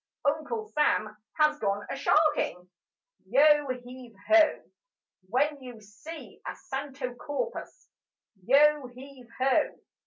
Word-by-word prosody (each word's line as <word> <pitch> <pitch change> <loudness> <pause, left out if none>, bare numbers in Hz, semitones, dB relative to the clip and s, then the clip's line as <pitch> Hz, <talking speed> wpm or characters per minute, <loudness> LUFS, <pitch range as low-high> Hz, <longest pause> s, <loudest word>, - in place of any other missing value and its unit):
Uncle 315 +10 -1
Sam 215 - +1 0.2
has 305 -1 +3
gone 205 -1 -1
a - - -4
sharking: 290 - +1 0.6
Yo 295 +4 +5
heave 250 -2 -8
ho! 325 -1 +4 0.7
When 285 +5 0
you 245 -3 -10
see 215 +11 -11
a - - -4
santo 270 -2 -5
corpus, 295 - -6 0.6
Yo 285 +3 +4
heave 255 0 -13
ho! 260 +1 +1
275 Hz, 105 wpm, -28 LUFS, 245-300 Hz, 0.7 s, Yo